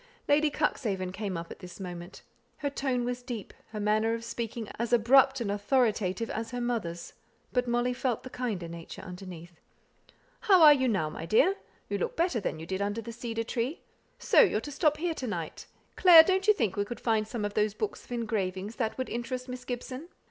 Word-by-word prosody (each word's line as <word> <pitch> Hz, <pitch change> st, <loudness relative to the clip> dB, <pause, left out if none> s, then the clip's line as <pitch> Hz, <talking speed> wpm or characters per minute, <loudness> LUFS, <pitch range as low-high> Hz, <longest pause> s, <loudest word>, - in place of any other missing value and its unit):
Lady 300 Hz, +1 st, +4 dB
Cuxhaven 210 Hz, -11 st, -1 dB
came 195 Hz, -2 st, -4 dB
up 165 Hz, 0 st, -7 dB
at -, -, -9 dB
this 180 Hz, -1 st, -11 dB
moment. 175 Hz, -1 st, -8 dB, 0.3 s
Her 285 Hz, -1 st, -2 dB
tone 260 Hz, -3 st, -1 dB
was 245 Hz, 0 st, -2 dB
as -, -, -21 dB
deep, 240 Hz, -6 st, -6 dB, 0.2 s
her 215 Hz, -, -6 dB
manner 215 Hz, +2 st, +2 dB
of 230 Hz, 0 st, -7 dB
speaking 230 Hz, -1 st, -4 dB
as 235 Hz, 0 st, -1 dB
abrupt 265 Hz, +3 st, +5 dB
and 220 Hz, -4 st, -1 dB
authoritative, 210 Hz, -1 st, +1 dB
as 225 Hz, +1 st, -4 dB
her 245 Hz, -, -4 dB
mother's, 220 Hz, -9 st, -3 dB, 0.4 s
but 250 Hz, -1 st, +1 dB
Molly 240 Hz, +1 st, +1 dB
felt 245 Hz, -2 st, -2 dB
the 255 Hz, -, -9 dB
kinder 215 Hz, -9 st, -3 dB
nature 165 Hz, +2 st, -9 dB
underneath. 180 Hz, -2 st, -10 dB, 0.8 s
"How 390 Hz, -7 st, +5 dB
are 300 Hz, -1 st, +10 dB
you 260 Hz, -2 st, +1 dB
now, 185 Hz, -9 st, 0 dB
my 165 Hz, +1 st, -7 dB
dear? 275 Hz, -, +4 dB, 0.3 s
You 200 Hz, 0 st, -2 dB
look -, -, -2 dB
better 335 Hz, -7 st, +1 dB
than 165 Hz, -5 st, -3 dB
you 160 Hz, -, -7 dB
did 190 Hz, +3 st, -3 dB
under 205 Hz, +2 st, -1 dB
the 230 Hz, -, -7 dB
cedar 230 Hz, -1 st, -3 dB
tree. 245 Hz, +6 st, -3 dB, 0.4 s
So -, -, +3 dB
you're 405 Hz, -, +3 dB
to 290 Hz, -, -7 dB
stop 300 Hz, +1 st, +2 dB
here 335 Hz, +1 st, -1 dB
to 260 Hz, -5 st, -5 dB
night? 170 Hz, -7 st, -5 dB, 0.3 s
Clare, 340 Hz, -3 st, +9 dB
don't 380 Hz, +3 st, +1 dB
you 425 Hz, -, +8 dB
think 220 Hz, -, 0 dB
we 205 Hz, -, +1 dB
could 240 Hz, +3 st, -7 dB
find 220 Hz, -2 st, +1 dB
some 220 Hz, -2 st, -3 dB
of 205 Hz, -, -3 dB
those 210 Hz, 0 st, +1 dB
books 430 Hz, -, -4 dB
of -, -, -19 dB
engravings 210 Hz, -3 st, -2 dB
that 225 Hz, -4 st, -1 dB
would 260 Hz, -, -2 dB
interest 250 Hz, +2 st, -4 dB
Miss 250 Hz, 0 st, -7 dB
Gibson." 255 Hz, +5 st, -6 dB
230 Hz, 210 wpm, -29 LUFS, 200-255 Hz, 0.8 s, are